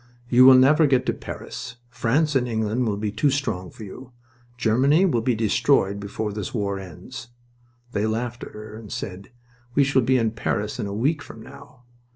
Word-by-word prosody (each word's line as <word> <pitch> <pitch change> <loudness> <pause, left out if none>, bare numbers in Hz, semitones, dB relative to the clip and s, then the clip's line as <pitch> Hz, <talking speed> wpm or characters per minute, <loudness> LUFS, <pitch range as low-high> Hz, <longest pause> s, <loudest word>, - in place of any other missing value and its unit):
"You 125 +1 +6
will 130 0 +9
never 150 +4 +5
get 130 -2 +2
to - - +1
Paris... 120 -2 -8 0.2
France 145 +6 +1
and 125 -2 +2
England 110 +1 -1
will 105 -2 -1
be 105 0 -2
too 145 +7 +1
strong 115 -11 -2
for 110 - -11
you... 120 +5 -11 0.4
Germany 130 - +3
will 125 -11 +1
be 125 0 +1
destroyed 110 -2 +2
before 100 +1 -4
this 105 +3 -5
war 100 -3 -1
ends." 90 +3 -10 0.6
They 105 -1 0
laughed 120 +2 -3
at - - -9
her 105 0 -9
and 110 -2 -10
said: 95 0 -6 0.5
"We 140 - +5
shall 135 -1 +2
be 130 +2 +2
in 115 -2 +1
Paris 105 -2 -2
in - - -2
a - - -5
week 140 +9 0
from 110 -5 -11
now. 125 - -14
115 Hz, 195 wpm, -23 LUFS, 105-130 Hz, 0.6 s, will